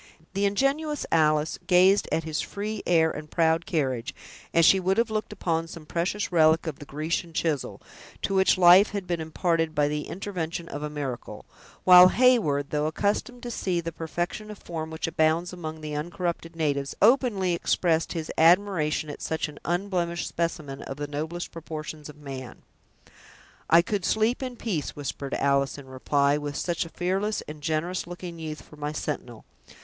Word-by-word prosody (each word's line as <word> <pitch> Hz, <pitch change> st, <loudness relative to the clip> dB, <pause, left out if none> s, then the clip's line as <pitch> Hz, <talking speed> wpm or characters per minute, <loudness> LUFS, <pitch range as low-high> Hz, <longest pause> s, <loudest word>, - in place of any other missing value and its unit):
The 200 Hz, +1 st, +1 dB
ingenuous 275 Hz, +8 st, 0 dB
Alice 155 Hz, -1 st, +2 dB
gazed 185 Hz, +2 st, +5 dB
at 165 Hz, -, 0 dB
his 155 Hz, -1 st, -2 dB
free 210 Hz, +1 st, -4 dB
air 160 Hz, -2 st, +4 dB
and 150 Hz, 0 st, -8 dB
proud 165 Hz, 0 st, +2 dB
carriage, 130 Hz, -7 st, -1 dB, 0.4 s
as 165 Hz, -1 st, +4 dB
she 190 Hz, -, +6 dB
would 190 Hz, +1 st, +1 dB
have 230 Hz, -1 st, +2 dB
looked 215 Hz, 0 st, -2 dB
upon 165 Hz, -1 st, -1 dB
some 165 Hz, -1 st, -10 dB
precious 180 Hz, +6 st, -2 dB
relic 160 Hz, -1 st, +4 dB
of 160 Hz, -4 st, -5 dB
the 145 Hz, -, -9 dB
Grecian 160 Hz, +4 st, -3 dB
chisel, 155 Hz, -5 st, -1 dB, 0.4 s
to 195 Hz, -, 0 dB
which 190 Hz, 0 st, +4 dB
life 180 Hz, +3 st, +7 dB
had 200 Hz, -2 st, -3 dB
been 175 Hz, -2 st, -2 dB
imparted 165 Hz, 0 st, 0 dB
by 145 Hz, -1 st, +3 dB
the 150 Hz, 0 st, -3 dB
intervention 175 Hz, -3 st, -4 dB
of 145 Hz, -, -6 dB
a 150 Hz, -, -3 dB
miracle; 140 Hz, -5 st, -6 dB, 0.4 s
while 180 Hz, 0 st, +10 dB
Heyward, 185 Hz, -, +3 dB
though 150 Hz, 0 st, 0 dB
accustomed 210 Hz, +8 st, -1 dB
to 240 Hz, -, -4 dB
see 185 Hz, -6 st, -1 dB
the 165 Hz, 0 st, -4 dB
perfection 175 Hz, +6 st, -4 dB
of 210 Hz, -, -8 dB
form 160 Hz, -3 st, -6 dB
which 160 Hz, 0 st, -4 dB
abounds 165 Hz, +2 st, +1 dB
among 160 Hz, -3 st, -6 dB
the 155 Hz, -1 st, -5 dB
uncorrupted 170 Hz, +1 st, -3 dB
natives, 140 Hz, -4 st, -1 dB
openly 210 Hz, -5 st, +3 dB
expressed 170 Hz, -1 st, +1 dB
his 160 Hz, -3 st, -4 dB
admiration 165 Hz, -3 st, +3 dB
at 145 Hz, -, -8 dB
such 160 Hz, 0 st, -2 dB
an 150 Hz, -1 st, -11 dB
unblemished 175 Hz, -1 st, -1 dB
specimen 155 Hz, -5 st, -3 dB
of 135 Hz, -, -7 dB
the 145 Hz, -, -3 dB
noblest 155 Hz, +4 st, -4 dB
proportions 155 Hz, -2 st, -7 dB
of 150 Hz, -, -12 dB
man. 135 Hz, -4 st, -8 dB, 1.1 s
"I 170 Hz, +1 st, +7 dB
could 200 Hz, 0 st, -2 dB
sleep 220 Hz, +6 st, +1 dB
in 255 Hz, -2 st, -4 dB
peace," 190 Hz, -, -3 dB
whispered 140 Hz, -1 st, -4 dB
Alice, 140 Hz, 0 st, +1 dB
in 140 Hz, -, -10 dB
reply, 140 Hz, +2 st, +1 dB
"with 145 Hz, -1 st, -5 dB
such 170 Hz, +2 st, -1 dB
a -, -, -9 dB
fearless 190 Hz, +5 st, -1 dB
and 150 Hz, 0 st, -8 dB
generous 160 Hz, +4 st, -2 dB
looking 175 Hz, -1 st, -7 dB
youth 155 Hz, -1 st, -6 dB
for 150 Hz, -, -16 dB
my 150 Hz, 0 st, -3 dB
sentinel. 130 Hz, -7 st, -5 dB
165 Hz, 175 wpm, -26 LUFS, 150-185 Hz, 1.1 s, while